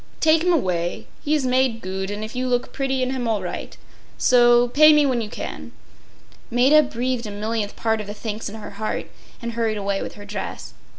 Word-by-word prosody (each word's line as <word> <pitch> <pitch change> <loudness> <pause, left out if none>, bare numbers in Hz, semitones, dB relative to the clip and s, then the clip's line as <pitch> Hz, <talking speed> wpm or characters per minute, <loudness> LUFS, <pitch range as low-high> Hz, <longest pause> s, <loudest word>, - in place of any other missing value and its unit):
Take 315 0 +4
him 360 +1 +2
away. 180 - 0 0.2
He 300 +1 +2
is 285 -4 0
made 255 -2 +2
goot; 190 -1 -4
and 205 +1 -4
if 220 +3 -7
you 255 +1 -1
look 245 -1 -1
bretty 270 -1 0
in 255 - -1
him 255 -3 -2
all 215 -4 0
right. 180 - -6 0.4
So. 240 -1 +5
Pay 305 +4 +7
me 300 -1 +5
when 255 -4 +1
you 215 - -5
can.” - - -7 0.8
Maida 260 +6 +5
breathed 250 -3 -2
a - - -5
millionth 210 0 -3
part 225 -1 0
of 210 - -8
the 205 - -6
thanks 215 0 -5
in 210 - -9
her 210 -2 -8
heart, 215 +2 -4 0.3
and 235 - -2
hurried 225 -2 -1
away 200 -1 -1
with - - -6
her 205 - -11
dress. 205 -1 -6
230 Hz, 215 wpm, -22 LUFS, 210-260 Hz, 0.8 s, Pay